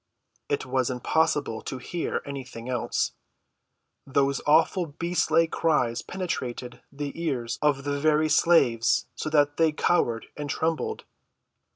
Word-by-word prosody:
It 145 - -1
was 130 -1 0
impossible 130 -2 0
to 130 - -5
hear 165 +7 -3
anything 130 -4 -7
else. 125 -2 -1 1.0
Those 140 0 +1
awful 160 +2 +3
beast‐like 165 0 +1
cries 125 -8 +1
penetrated 125 -9 -5
the 140 0 -4
ears 125 -6 -2
of 145 -2 +2
the 145 0 -2
very 155 +1 +3
slaves 130 -7 +3
so - - -4
that 145 -1 +2
they 160 -1 +4
cowered 120 -7 +1
and 145 -1 -5
trembled. 160 +2 -1
145 Hz, 120 wpm, -26 LUFS, 125-160 Hz, 1.0 s, they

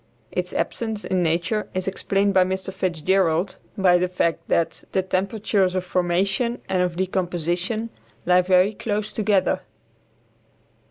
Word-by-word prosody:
Its - - -2
absence 220 -3 -2
in 185 -1 0
nature 170 +6 0
is 185 0 -2
explained 195 +1 +1
by 185 -1 +6
Mr. 190 +1 -3
Fitzgerald 180 0 +1 0.2
by 180 -2 +5
the 180 - +1
fact 175 -2 0
that 165 - 0
"the 190 - +2
temperatures 190 0 0
of 185 - 0
formation 190 +7 0
and 185 -1 +1
of 180 -1 0
decomposition 185 +4 -1 0.3
lie 180 +1 +5
very 185 +3 +3
close 210 0 -3
together." 205 -3 +1
185 Hz, 130 wpm, -23 LUFS, 180-200 Hz, 0.3 s, by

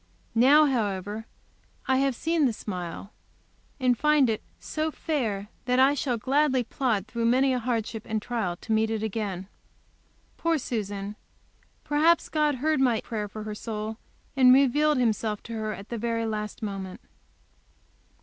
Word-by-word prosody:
Now, 275 +6 +6
however, 210 -4 -2 0.6
I 260 - +3
have 270 -1 +1
seen 320 +1 +2
the 235 - -1
smile, 185 -1 -6 0.7
and 250 -2 +3
find 295 -2 +3
it 215 - -3 0.2
so 310 0 -2
"fair," 225 -11 -2 0.2
that 250 0 +2
I 265 +2 +6
shall 255 -3 -1
gladly 265 +2 +2
plod 230 -5 -1
through 230 +1 -3
many 260 +3 +3
a 250 - 0
hardship 225 -2 -3
and 220 0 -1
trial 210 -6 -2
to 225 - -6
meet 220 0 +3
it 220 -1 -2
again. 200 -4 -3 0.9
Poor 335 -1 +1
Susan! 205 -5 -4 0.7
Perhaps 310 +3 +3
God 300 -2 +2
heard 305 +3 +1
my 240 -4 +3
prayer 215 -3 -4
for 215 +1 -7
her 215 0 -5
soul, 215 0 -5 0.4
and 255 -2 +7
revealed 280 +3 +4
Himself 220 -3 0
to 230 - -8
her 215 -1 -2
at 200 0 -8
the 235 - -4
very 230 0 -1
last 215 0 -4
moment. 195 -3 -5
230 Hz, 155 wpm, -27 LUFS, 215-270 Hz, 0.9 s, and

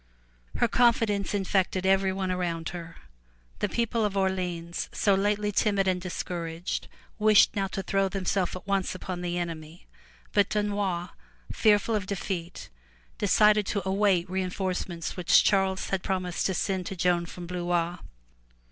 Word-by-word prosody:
'' - - -25
Her 240 - +5
confidence 225 -4 +2
infected 190 -1 0
everyone 190 0 +2
around 170 -2 -2
her. 170 -1 -8 0.6
The 210 - 0
people 230 +1 0
of 200 -2 -1
Orleans 180 -3 -2
so 205 - +2
lately 205 +1 +1
timid 200 -1 +1
and 185 -1 +1
discouraged, 170 -1 -4 0.3
wished 215 -1 +5
now 195 -1 0
to 195 0 -4
throw 195 0 +1
themselves 190 -1 -1
at 185 - -8
once 195 -2 0
upon 185 -1 -5
the 175 0 -2
enemy. 165 -1 -6 0.5
But 200 -1 +3
Dunois, 200 -4 -1 0.4
fearful 215 0 +3
of 205 -3 -1
defeat, 180 -3 -4 0.5
decided 210 0 +4
to 200 -3 -2
await 190 -2 +2
reinforcements 185 -2 -3
which 180 -2 +5
Charles 190 -1 +1
had 195 -1 0
prom 190 0 -1
ised 180 -1 -1
to 190 - -1
send 190 -2 -1
to 195 - -4
Joan 175 -1 +1
from 175 +1 -8
Blois. 175 -1 -1
190 Hz, 145 wpm, -27 LUFS, 175-200 Hz, 0.6 s, Her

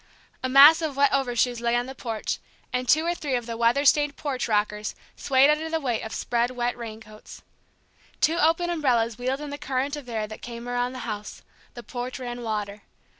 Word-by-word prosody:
A 260 - -2
mass 285 +5 +8
of 300 -4 -3
wet 280 0 +4
over 265 -3 0
shoes 240 0 +1
lay 235 0 +1
on 240 0 +1
the 265 - -7
porch, 230 -4 -4 0.3
and 250 -1 -2
two 315 +4 +4
or 345 - +1
three 290 -6 -2
of 240 -1 -2
the 230 0 -5
weather 235 +5 +2
stained 295 0 +4
porch 275 -4 -3
rockers 210 -1 -1 0.2
swayed 275 +1 +4
under 310 +2 -1
the 325 0 0
weight 245 -6 -1
of 220 - -7
spread 240 0 0
wet 245 -1 -2
raincoats. 220 -2 -10 0.8
Two 325 +2 +2
opened 345 +2 +2
umbrellas 240 -8 +1
wheeled 260 +3 -2
in 295 -1 -6
the 285 - -6
current 275 +1 -2
of 285 -4 -9
air 220 -2 -2
that 215 0 -10
came 235 0 -8
around 245 +1 -1
the 255 - -6
house; 210 -1 -6 0.3
the 240 - -8
porch 245 +1 -5
ran 245 -2 -6
water. 210 -2 -4
250 Hz, 210 wpm, -25 LUFS, 235-285 Hz, 0.8 s, mass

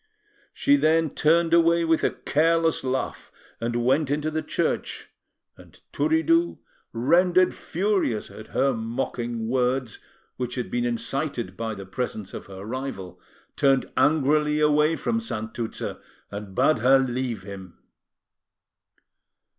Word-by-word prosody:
She 285 0 +3
then 160 - +2
turned 165 +2 +2
away 170 0 +4
with 160 -1 +2
a - - +4
careless 165 +2 +1
laugh, 130 0 -3 0.3
and 120 +1 -1
went 135 +3 +2
into 150 +2 -1
the 155 0 -1
church, - - -2 0.4
and - - -17
Turiddu, 330 +2 +2 0.3
rendered 175 +9 +3
furious 185 - -1
at 110 - -11
her 135 0 +1
mocking 115 0 -3
words, 125 -1 0 0.4
which 125 -1 -3
had 125 -2 -4
been 120 0 0
incited 120 +2 -2
by 115 -1 -4
the 95 -1 -8
presence 105 -1 -4
of - - -8
her 95 0 -9
rival, 100 -8 -6 0.3
turned 135 -2 +2
angrily 150 0 +3
away 150 +1 +3
from 230 +6 -1
Santuzza, 115 - -5 0.3
and 100 -1 -7
bade 140 0 +3
her 130 +3 +5
leave 125 -5 -2
him. 95 -2 -10
135 Hz, 125 wpm, -25 LUFS, 115-160 Hz, 0.4 s, her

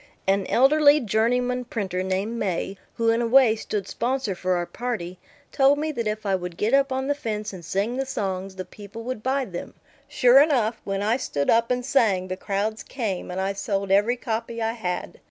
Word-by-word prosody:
An 195 0 +1
elderly 290 +3 +5
journeyman 245 +2 +1
printer 190 -6 -3
named 195 +5 -2
May, 195 0 -2 0.2
who 230 0 +1
in 230 +1 +1
a 235 - 0
way 245 -2 +6
stood 210 -2 -4
sponsor 250 -3 -1
for 185 0 -1
our 175 0 -1
party, 185 -6 -5 0.3
told 275 +1 +4
me 310 +1 -1
that 235 -6 -3
if 215 0 -3
I 195 - +1
would 180 -2 -3
get 220 +4 0
up 275 0 +4
on 265 0 -1
the 285 - +1
fence 215 -6 -4
and 180 -2 -9
sing 205 +9 -1
the 270 - -1
songs, 190 -5 -3
the 185 -1 -6
people 205 +4 -10
would 255 -2 -4
buy 265 +2 0
them. 175 -5 -7 0.3
Sure 250 +2 +6
enough, 245 -7 +1
when 195 0 -2
I 220 +4 +2
stood 145 - -1
up 230 +1 +3
and 250 0 -1
sang 215 -9 +2
the 185 - -2
crowds 205 +3 -2
came, 215 -10 -4
and 180 +1 -4
I 195 +1 0
sold 195 -1 -2
every 210 +5 +3
copy 230 -1 -4
I 225 0 0
had. 180 -6 -4
220 Hz, 210 wpm, -24 LUFS, 195-250 Hz, 0.3 s, way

